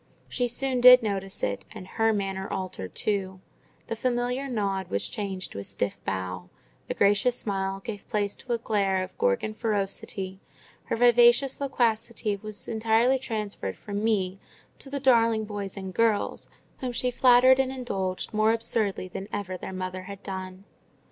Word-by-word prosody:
She 245 -1 -1
soon 255 +1 0
did 250 0 +9
notice 195 -2 -3
it, 100 -1 -2
and 200 -4 -8
her 225 +3 +1
manner 195 -2 -3
altered 140 - -5
too: 190 -3 -2 0.5
the 230 - -4
familiar 250 +3 -1
nod 200 -6 -2
was 100 0 -1
changed 195 -3 -5
to - - -6
a - - -5
stiff 100 0 -3
bow, 95 -1 -4 0.4
the - - -3
gracious 205 +5 +3
smile 195 -1 0
gave 205 0 -7
place 205 -2 -1
to 255 - -8
a - - +1
glare 200 -4 0
of 185 - -9
Gorgon 100 - +1
ferocity; 195 -3 -2 0.5
her - - -1
vivacious 240 +3 +5
loquacity 230 -5 0
was 215 +1 -7
entirely 230 +3 +2
transferred 210 - -4
from 205 0 -4
me 195 -4 0 0.4
to 275 - -10
"the 280 0 -2
darling 230 -4 +3
boy 205 -1 -4
and 190 -1 -6
girls," 225 -1 +1 0.3
whom 255 -1 -3
she 250 +1 0
flattered 255 +1 +6
and 265 -1 +1
indulged 195 -9 -3
more 215 +1 +3
absurdly 220 -4 -1
than 190 +2 -7
ever 195 -2 -3
their 185 - -7
mother 185 0 -5
had 200 0 -9
done. 190 -1 -6
210 Hz, 160 wpm, -27 LUFS, 190-235 Hz, 0.5 s, did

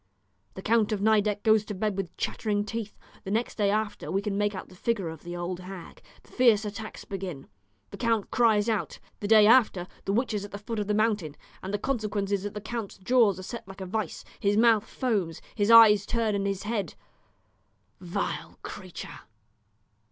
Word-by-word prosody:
The 190 - -8
Count 220 -1 +2
of 210 - 0
Nideck 210 0 +2
goes 220 -1 +4
to 210 - -5
bed 210 +1 -1
with 190 -3 -5
chattering 205 -2 -1
teeth. 215 0 -5 0.3
The - - -6
next 225 +3 -1
day 205 -1 +3
again 210 +1 -2
we 195 +1 0
can 205 -2 -2
make 205 0 0
out 185 - -7
the 185 - -15
figure 200 -3 -1
of 160 - -9
the 175 0 -7
old 175 +1 -4
hag; 185 -1 -10 0.2
the - - -22
fierce 230 -4 +4
attacks 215 +1 -7
begin; 185 -8 -6 0.5
the - - -8
count 230 -4 0
cries 220 -3 +3
out. 220 -3 -1 0.2
The 205 - -3
day 215 -1 +7
after, 215 -6 +4 0.2
the - - 0
witch 240 +3 0
is 205 -2 -2
at 205 - -7
the 200 - -6
foot 215 +2 -5
of 205 - -2
the 210 - +1
mountain, 210 -9 0 0.3
and 190 - -5
the 205 - 0
consequence 210 -4 -2
is 200 -2 +1
that 205 +1 -6
the 210 - -4
count's 230 -2 -5
jaws 210 -1 +3
are 185 - -8
set 230 +2 -7
like 195 0 -11
a 190 - -5
vice; 215 +3 -4
his 205 +1 +1
mouth 225 -2 +5
foams; 200 - -2
his 205 -1 0
eyes 215 -3 +8
turn 230 -3 0
in 200 -1 -1
his 195 -1 -2
head. 205 -6 -3 1.0
Vile 175 -1 -4
creature! - - -8
205 Hz, 205 wpm, -27 LUFS, 195-220 Hz, 1.0 s, eyes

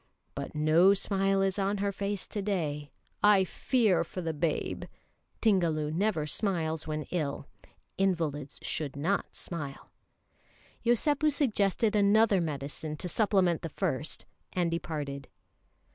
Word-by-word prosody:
"But - - -6
no 160 +6 +5
smile 195 0 +1
is 195 +1 0
on 200 +1 +1
her 200 0 0
face 200 0 -3
to 205 - -3
day; 155 -8 -2 0.3
I 205 -2 +6
fear 200 -3 +2
for 175 - -7
the 165 -2 -2
babe." 155 +1 -1 0.6
(Tingalu 165 -8 +2
never 175 -2 0
smiles 160 -3 -1
when 155 0 -2
ill. 145 -5 -2 0.5
Invalids 160 -7 0
should 145 -4 -2
not 165 +8 -1
smile.) 145 -6 -6 0.9
Yosépu 290 +6 +3
suggested 220 -6 +2
another 205 -1 +4
medicine 150 0 -4
to 180 - -4
supplement 190 -4 +2
the 165 - -4
first, 155 -4 -2 0.3
and 175 -2 +1
departed. 150 -4 -4
180 Hz, 125 wpm, -30 LUFS, 155-200 Hz, 0.9 s, I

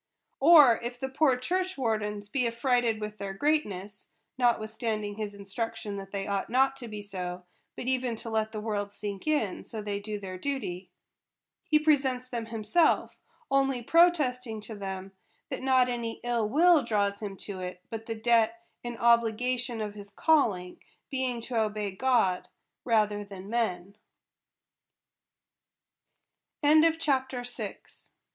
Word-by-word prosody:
Or 290 -6 +8
if 240 +1 -5
the 265 - -3
poor 265 -1 +3
church 365 +8 -1
wardens 210 -4 -1
be 245 +3 0
affrighted 235 -1 +1
with 210 0 -6
their 195 -1 -5
greatness 205 -8 -1 0.3
(notwith 235 -4 +1
standing 215 -2 -2
his 210 -2 -4
instruction 200 +1 -5
that 195 0 -8
they 195 -1 -3
ought 200 -1 -2
not 265 +2 +3
to 245 -3 -7
be 210 -2 -7
so, 180 -2 -6 0.3
but - - -6
even 255 -2 0
to 230 - -7
let 220 0 0
the 215 - -4
world 205 -2 -2
sink, 205 -1 -6 0.4
so 220 - -7
they 205 -1 -3
do 210 0 -5
their 185 -2 -7
duty), 185 -9 -3 0.8
he 305 - +4
presents 270 -5 +2
them 235 -3 -4
himself; 230 +9 +2 0.4
only 270 -2 +2
protesting 260 -8 +3
to 220 - -7
them, 195 -2 -6 0.4
that - - -4
not 260 -1 +4
any 235 -2 -3
ill 235 -3 0
will 330 +4 +5
draws 200 -3 0
him 200 -2 -5
to 195 -1 -6
it, 180 0 -6
but 225 0 -6
the 225 - -3
debt 230 0 +2 0.2
and 240 -1 -5
obligation 235 +1 +2
of 210 -1 -4
his 205 -1 -10
calling, 200 - +2 0.3
being 260 -3 -1
to 230 0 -1
obey 210 -2 -2
God 220 -4 +1 0.4
rather 210 -3 +2
than 200 0 -10
men. 200 -5 -1 2.7
CHAPTER 295 -4 +3
VII. 245 0 -5
225 Hz, 145 wpm, -29 LUFS, 205-255 Hz, 2.7 s, Or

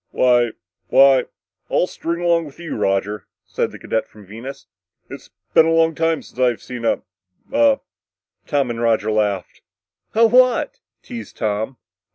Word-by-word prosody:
"Why... 120 -2 +3 0.3
why... 135 -2 +5 0.4
I'll - - +2
string 170 -1 -4
along 170 -1 +2
with 145 - -12
you, 170 -2 -5
Roger," 105 0 -1 0.2
said - - -2
the - - -10
cadet 110 - -2
from 105 -2 -16
Venus. 120 +8 -9 0.5
"It's - - -10 0.2
been 160 - +6
a - - +2
long 165 0 +3
time 165 0 0
since - - -15
I've 125 -3 +2
seen 120 -2 -6
a - - +1 0.5
a 285 -1 +3 0.3
" - - -50
Tom 140 -4 0
and 115 0 -5
Roger 110 -2 +1
laughed. 105 -4 -1 0.5
"A 230 +1 +6
what?" 250 +1 +3 0.2
teased 235 -2 -9
Tom. 110 +4 -2
130 Hz, 160 wpm, -20 LUFS, 110-165 Hz, 0.5 s, been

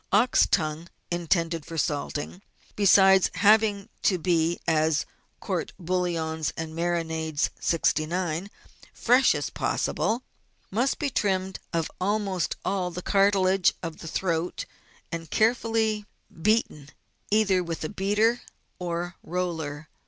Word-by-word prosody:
Ox 225 +6 +4
tongue 160 0 -1 0.2
intended 170 -1 0
for 165 +1 -8
salting, 150 +4 -2 0.3
besides 190 -2 +6
having 205 +1 +4
to 185 - +2
be 170 -1 +1
as 155 -1 +2 0.3
COURT - - -3
BOUILLONS 165 -3 -1
AND 160 0 -5
MARINADES 160 -3 -1
69 170 +2 0 0.5
fresh 250 +3 +4
as - - -3
possible, 235 +4 -1 0.5
must 245 +7 +1
be 285 -2 -2
trimmed 190 -4 -1
of 165 -2 -1
almost 195 -3 0
all 190 -2 0
the 175 +1 -7
cartilage 195 -2 +3
of 165 -2 -5
the 165 - -8
throat, 170 0 -2 0.5
and 165 -1 -5
carefully 220 -2 +1 0.3
beaten 195 -8 +1 0.4
either 200 -4 +3
with 165 -2 -5
a 155 - -3
beater 210 +4 +1 0.4
or 175 0 -4
roller. 160 -4 -4
180 Hz, 115 wpm, -26 LUFS, 165-200 Hz, 0.5 s, besides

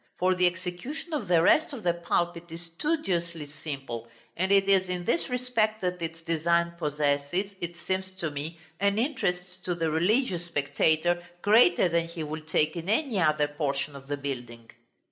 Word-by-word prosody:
For 185 +1 +3
the 180 0 +4
execution 185 - -5
of 245 -10 -2
the 170 -2 +4
rest 315 - +4
of 240 -6 -7
the 175 - +3
pulpit 170 0 -1
is 165 +1 -6
studiously 170 - -1 0.2
simple, 135 -6 -5 0.3
and 190 +3 0
it 195 -1 +5
is 190 -2 +4
in 180 -1 -3
this 335 - +1
respect 245 -4 0
that 180 -1 -2
its 165 0 -5
design 170 +1 +2
possesses, 150 +5 0
it 175 0 -4
seems 190 +2 -2
to 170 -4 -3
me, 150 +4 -5 0.2
an 200 +1 +2
interest 180 -8 -1
to 180 - 0
the 165 -2 0
religious 175 - +1
spectator 160 +3 +1 0.2
greater 205 -4 +6
than 170 -1 +1
he 165 -1 -5
will 155 +1 -5
take 155 0 +1
in 170 +2 -5
any 225 -2 +1
other 155 -3 +3
portion 145 -1 -2
of 135 0 -11
the 145 0 -2
building. 120 -5 -6
170 Hz, 175 wpm, -28 LUFS, 155-190 Hz, 0.3 s, greater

